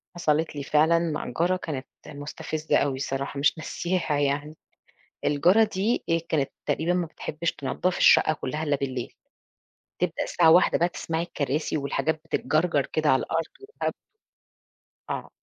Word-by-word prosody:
حصَلِت 160 Hz, -2 st, 0 dB
لي 145 Hz, -, -4 dB
فعلًا 155 Hz, +4 st, +4 dB
مع 160 Hz, -5 st, -2 dB
جارة 175 Hz, +2 st, +3 dB
كانت 145 Hz, -7 st, -5 dB, 0.2 s
مستفزّة 150 Hz, +1 st, -2 dB
أوي 140 Hz, -2 st, +1 dB
الصراحة 135 Hz, +1 st, -3 dB
مش 145 Hz, +4 st, +3 dB
ناسياها 165 Hz, -1 st, -1 dB
يعني، 145 Hz, +2 st, -1 dB, 0.7 s
الجارة 175 Hz, +10 st, +4 dB
دي 205 Hz, +6 st, 0 dB
هي 165 Hz, 0 st, +2 dB
كانت 155 Hz, -4 st, -1 dB, 0.2 s
تقريبًا 165 Hz, +3 st, +1 dB
ما 180 Hz, -1 st, 0 dB
بتحبّش 165 Hz, +1 st, -3 dB
تنضّف 155 Hz, +6 st, -2 dB
الشقة -, -, +6 dB
كُلّها 150 Hz, 0 st, -4 dB
إلّا 145 Hz, -2 st, +1 dB
بالليل، 130 Hz, -3 st, -4 dB, 0.9 s
تبدأ 175 Hz, -2 st, -1 dB
الساعة 165 Hz, -2 st, +4 dB
01:00 175 Hz, +3 st, +5 dB
بقى 175 Hz, -, +3 dB
تسمعي 165 Hz, -1 st, -3 dB
الكراسي 150 Hz, -2 st, -2 dB
والحاجات 155 Hz, +2 st, -1 dB
بتتجَرجَر 155 Hz, -3 st, +1 dB
كده 155 Hz, -1 st, +1 dB
على 130 Hz, -, +4 dB
الأرض 165 Hz, 0 st, -1 dB, 0.2 s
وهَبْد. 410 Hz, +3 st, -4 dB, 1.2 s
آه -, -, -4 dB
155 Hz, 145 wpm, -26 LUFS, 145-170 Hz, 1.2 s, الشقة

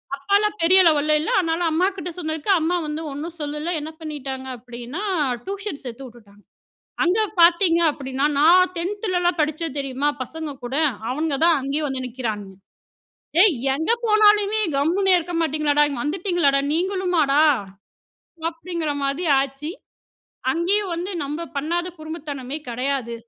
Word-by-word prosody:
அப்பாலாம 405 Hz, +9 st, +1 dB
பெரிய 370 Hz, +3 st, +6 dB
லெவல்ல 305 Hz, -1 st, +3 dB
இல்ல. 315 Hz, -, -2 dB
அதனால, 330 Hz, -1 st, -1 dB
அம்மாகிட்ட 360 Hz, +1 st, -1 dB
சொன்னதுக்கு, 315 Hz, +2 st, -2 dB
அம்மா 335 Hz, +3 st, +1 dB
வந்து 300 Hz, +1 st, -4 dB
ஒண்ணும் 315 Hz, +5 st, -6 dB
சொல்லல. 300 Hz, +2 st, -3 dB
என்ன 305 Hz, +2 st, -6 dB
பண்ணிட்டாங்க 270 Hz, -4 st, -6 dB
அப்படின்னா, 245 Hz, -, -8 dB, 0.4 s
டியூஷன் 390 Hz, -5 st, -5 dB
சேத்து 250 Hz, +2 st, -7 dB
உட்டுட்டாங்க. 210 Hz, -4 st, -18 dB, 0.6 s
அங்க 360 Hz, +5 st, +2 dB, 0.2 s
பாத்தீங்க 340 Hz, 0 st, +5 dB
அப்படின்னா, 270 Hz, 0 st, -2 dB
நான் 355 Hz, +5 st, +6 dB
10த் 375 Hz, +5 st, -3 dB
துலலாம் 355 Hz, -3 st, +1 dB
படிச்சேன் 310 Hz, 0 st, -2 dB
தெரியுமா 275 Hz, +1 st, -1 dB
பசங்க 315 Hz, +3 st, -6 dB
கூட, 250 Hz, -, -5 dB, 0.4 s
அவன்ங்க 295 Hz, +2 st, -1 dB
தான் 335 Hz, -2 st, +5 dB
அங்கேயேயும் 285 Hz, +3 st, -2 dB
வந்து 260 Hz, -1 st, -4 dB
நிக்குறானுங்க. 215 Hz, -6 st, -5 dB, 0.8 s
'ஏய் 380 Hz, -4 st, +6 dB, 0.2 s
எங்க 320 Hz, +9 st, 0 dB
போனாலுமே 425 Hz, -1 st, +4 dB, 0.2 s
கம்முன்னே 370 Hz, +7 st, +2 dB
இருக்க 345 Hz, 0 st, -4 dB
மாட்டீங்களாடா? 300 Hz, -1 st, +2 dB
இங்க 275 Hz, -4 st, -4 dB
வந்துட்டீங்களாடா, 325 Hz, -3 st, +1 dB
நீங்களுமாடா?" 345 Hz, -5 st, +2 dB, 1.1 s
அப்படிங்கிற 330 Hz, -2 st, -4 dB
மாதி 275 Hz, +6 st, -1 dB, 0.2 s
ஆச்சி. 275 Hz, +3 st, -6 dB, 0.8 s
அங்கேயும் 375 Hz, +4 st, 0 dB
வந்து 355 Hz, +4 st, -4 dB
நம்ப 295 Hz, +4 st, -4 dB, 0.2 s
பண்ணாத 340 Hz, +5 st, -1 dB
குறும்புத்தனமே 295 Hz, -4 st, -6 dB
கெடையாது. 250 Hz, 0 st, -2 dB
310 Hz, 130 wpm, -22 LUFS, 275-355 Hz, 1.1 s, பெரிய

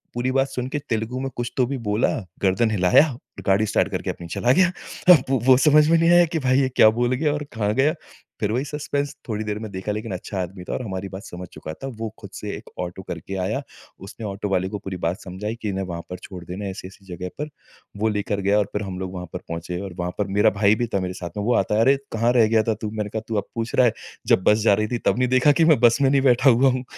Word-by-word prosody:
पूरी 125 Hz, +2 st, 0 dB
बात 135 Hz, 0 st, +2 dB
सुन 125 Hz, -1 st, -4 dB
के 145 Hz, -, -2 dB
तेलुगु 115 Hz, +3 st, -2 dB
में 135 Hz, -, -2 dB
कुछ 120 Hz, 0 st, -3 dB
तो 130 Hz, -, +4 dB
भी 140 Hz, +2 st, -3 dB
बोला, 105 Hz, +3 st, +2 dB, 0.3 s
गर्दन 100 Hz, +4 st, +2 dB
हिलाया 95 Hz, -, +5 dB
और 120 Hz, -, -13 dB
गाड़ी 100 Hz, +3 st, +3 dB
स्टार्ट -, -, +1 dB
करके -, -, -3 dB
अपनी 85 Hz, -, -9 dB
चला 120 Hz, +8 st, +1 dB
गया। 185 Hz, +2 st, +4 dB, 0.4 s
अब 145 Hz, -7 st, +4 dB
वो 135 Hz, -1 st, +2 dB
वो 130 Hz, -1 st, +7 dB
समझ 150 Hz, +2 st, +5 dB
में 165 Hz, -, +5 dB
नहीं 165 Hz, +1 st, +3 dB
आया 175 Hz, 0 st, +7 dB
कि 160 Hz, -, +1 dB
भाई 130 Hz, -1 st, +2 dB
ये 130 Hz, -, +1 dB
क्या 110 Hz, -, +7 dB
बोल 120 Hz, +1 st, +2 dB
गया 145 Hz, +2 st, +1 dB
और 150 Hz, -, -3 dB
कहाँ 105 Hz, -2 st, 0 dB
गया, 140 Hz, +4 st, +3 dB, 0.5 s
फिर 105 Hz, -1 st, 0 dB
वही 125 Hz, +3 st, 0 dB
सस्पेंस। 145 Hz, -1 st, -3 dB
थोड़ी 110 Hz, -1 st, -2 dB
देर 105 Hz, 0 st, -3 dB
में 110 Hz, -2 st, -7 dB
देखा 95 Hz, +2 st, -4 dB
लेकिन 105 Hz, -1 st, -5 dB
अच्छा 95 Hz, +1 st, -4 dB
आदमी 90 Hz, +1 st, -6 dB
था -, -, -3 dB
और -, -, -2 dB
हमारी 95 Hz, -2 st, -5 dB
बात 95 Hz, +3 st, -8 dB
समझ 90 Hz, 0 st, -8 dB
चुका 80 Hz, -, -7 dB
था। 135 Hz, -, -8 dB
वो 115 Hz, -1 st, -3 dB
खुद -, -, -10 dB
से -, -, -5 dB
एक -, -, -13 dB
ऑटो 90 Hz, +1 st, -4 dB
करके 90 Hz, +2 st, -6 dB
आया। -, -, -1 dB, 0.5 s
उसने 110 Hz, +3 st, -8 dB
ऑटो 100 Hz, 0 st, -4 dB
वाले 95 Hz, -1 st, 0 dB
को 105 Hz, -, -4 dB
पूरी 95 Hz, -2 st, -6 dB
बात 85 Hz, +3 st, -1 dB
समझाई 100 Hz, +4 st, -5 dB
कि 105 Hz, -, -2 dB
इन्हें 95 Hz, 0 st, -2 dB
वहाँ 85 Hz, -2 st, -5 dB
पर 90 Hz, -, -5 dB
छोड़ 90 Hz, -3 st, -9 dB
देना, 95 Hz, +4 st, -6 dB
ऐसी-ऐसी 95 Hz, 0 st, -8 dB
जगह 90 Hz, +1 st, -5 dB
पर। 150 Hz, +1 st, -3 dB, 0.5 s
वो 110 Hz, +1 st, +1 dB
लेकर 105 Hz, -1 st, -2 dB
गया 100 Hz, +2 st, +2 dB
और 105 Hz, -, +2 dB
फिर 105 Hz, -, -1 dB
हम 95 Hz, -2 st, -5 dB
लोग 95 Hz, 0 st, -5 dB
वहाँ 90 Hz, -1 st, -5 dB
पर -, -, -4 dB
पहुँचे 85 Hz, +1 st, -4 dB
और 95 Hz, -2 st, -6 dB
वहाँ 90 Hz, 0 st, -2 dB
पर 105 Hz, -, 0 dB
मेरा 105 Hz, -, +6 dB
भाई 105 Hz, 0 st, +5 dB
भी 120 Hz, +1 st, -1 dB
था 100 Hz, -, +2 dB
मेरे 90 Hz, 0 st, -3 dB
साथ 90 Hz, -1 st, -6 dB
में। 105 Hz, -, -2 dB
वो 120 Hz, -, +2 dB
आता 105 Hz, -, +1 dB
है, 110 Hz, -, +3 dB
"अरे, 135 Hz, +4 st, +5 dB
कहाँ 115 Hz, +2 st, +1 dB
रह 115 Hz, -3 st, +5 dB
गया 110 Hz, 0 st, +3 dB
था 110 Hz, -, +3 dB
तू?" 110 Hz, -, -2 dB
मैंने 105 Hz, -1 st, -3 dB
कहा, 110 Hz, +1 st, -3 dB
"तू 115 Hz, -, -3 dB
अब 100 Hz, -, -2 dB
पूछ 115 Hz, 0 st, -3 dB
रहा 125 Hz, -, +5 dB
है? 115 Hz, -, +3 dB, 0.3 s
जब 95 Hz, -, +4 dB
बस 105 Hz, -, +5 dB
जा 105 Hz, -, +5 dB
रही 110 Hz, +2 st, +1 dB
थी 120 Hz, -, -2 dB
तब 105 Hz, -, +2 dB
नहीं 125 Hz, -1 st, +2 dB
देखा 130 Hz, +3 st, +5 dB
कि 160 Hz, +3 st, +3 dB
मैं 145 Hz, -, +4 dB
बस 120 Hz, +2 st, +4 dB
में 135 Hz, -, +4 dB
नहीं 140 Hz, -1 st, +3 dB
बैठा 130 Hz, +1 st, +5 dB
हुआ 130 Hz, +3 st, +5 dB
हूँ?" 130 Hz, 0 st, -2 dB
110 Hz, 285 wpm, -23 LUFS, 95-130 Hz, 0.5 s, वो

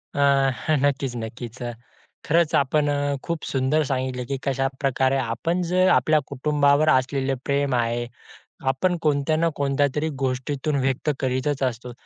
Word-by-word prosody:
अ, -, -, -2 dB, 0.6 s
नक्कीच 135 Hz, -3 st, 0 dB
नक्कीच, 115 Hz, +2 st, -7 dB
अ, 120 Hz, -, -3 dB, 0.5 s
खरंच 165 Hz, 0 st, +2 dB
आपण 145 Hz, +2 st, +2 dB
अ, 145 Hz, 0 st, 0 dB
खूप 170 Hz, -2 st, -3 dB
सुंदर 135 Hz, +4 st, +1 dB
सांगितलं, 130 Hz, -1 st, -2 dB
की 135 Hz, -, -1 dB
कशाप्रकारे 135 Hz, 0 st, 0 dB
आपण 130 Hz, +9 st, -1 dB
जर 185 Hz, +1 st, +4 dB
आपल्या 155 Hz, -1 st, +4 dB
कुटुंबावर 145 Hz, +2 st, +2 dB
असलेले 135 Hz, 0 st, +1 dB
प्रेम 140 Hz, -1 st, +1 dB
आहे, 120 Hz, 0 st, 0 dB, 0.7 s
आपण 175 Hz, +7 st, 0 dB
कोणत्या 150 Hz, 0 st, +1 dB
ना 165 Hz, +2 st, +2 dB
कोणत्यातरी 145 Hz, +2 st, 0 dB
गोष्टीतून 135 Hz, +3 st, -1 dB
व्यक्त 135 Hz, +3 st, 0 dB
करीतच 130 Hz, +2 st, -1 dB
असतो. 125 Hz, -1 st, -3 dB
135 Hz, 135 wpm, -23 LUFS, 130-150 Hz, 0.7 s, जर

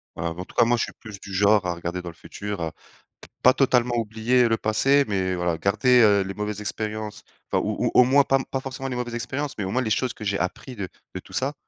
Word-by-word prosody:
Voilà. 85 Hz, 0 st, -3 dB
Bah, 90 Hz, -, -7 dB
en -, -, -6 dB
tout -, -, -18 dB
cas, 120 Hz, -, +5 dB
moi, 120 Hz, +1 st, +2 dB
je -, -, +1 dB
suis -, -, -6 dB
plus 105 Hz, -3 st, -11 dB
du 100 Hz, -1 st, -10 dB
genre 100 Hz, 0 st, +4 dB
à 90 Hz, -, 0 dB
regarder 85 Hz, +1 st, -4 dB
dans 90 Hz, -, -7 dB
le 85 Hz, -, -12 dB
futur, 105 Hz, -3 st, -6 dB
à 80 Hz, -1 st, -2 dB
p -, -, -21 dB, 0.2 s
pas 130 Hz, -, +7 dB
totalement 125 Hz, -3 st, +2 dB
oublier 115 Hz, +3 st, +2 dB
le 115 Hz, -1 st, +1 dB
passé, 135 Hz, +7 st, +3 dB
mais 95 Hz, -2 st, 0 dB
voilà, 90 Hz, -2 st, -1 dB
garder, 125 Hz, +7 st, +3 dB
heu, 100 Hz, -2 st, +5 dB
les 95 Hz, +1 st, -5 dB
mauvaises 105 Hz, 0 st, -4 dB
expériences 105 Hz, 0 st, -4 dB, 0.3 s
enfin -, -, +1 dB
ou -, -, -1 dB
ou -, -, +1 dB
au 125 Hz, -, +7 dB
moins 140 Hz, +3 st, +5 dB
pas 135 Hz, 0 st, +2 dB
pas 135 Hz, -, -1 dB
forcément 135 Hz, 0 st, -6 dB
les 125 Hz, -, -3 dB
mauvaises 120 Hz, -1 st, -3 dB
expériences, 135 Hz, +5 st, -3 dB
mais 105 Hz, -, -2 dB
au 95 Hz, -, -3 dB
moins 130 Hz, +3 st, +1 dB
les 110 Hz, -, -2 dB
choses 125 Hz, +3 st, 0 dB
que 110 Hz, -, -10 dB
j'ai 100 Hz, -1 st, -1 dB
appris 125 Hz, +7 st, -4 dB
de 100 Hz, -4 st, -4 dB, 0.3 s
de -, -, -3 dB
tout -, -, -16 dB
ça, 135 Hz, +3 st, -1 dB
110 Hz, 270 wpm, -24 LUFS, 95-125 Hz, 0.3 s, pas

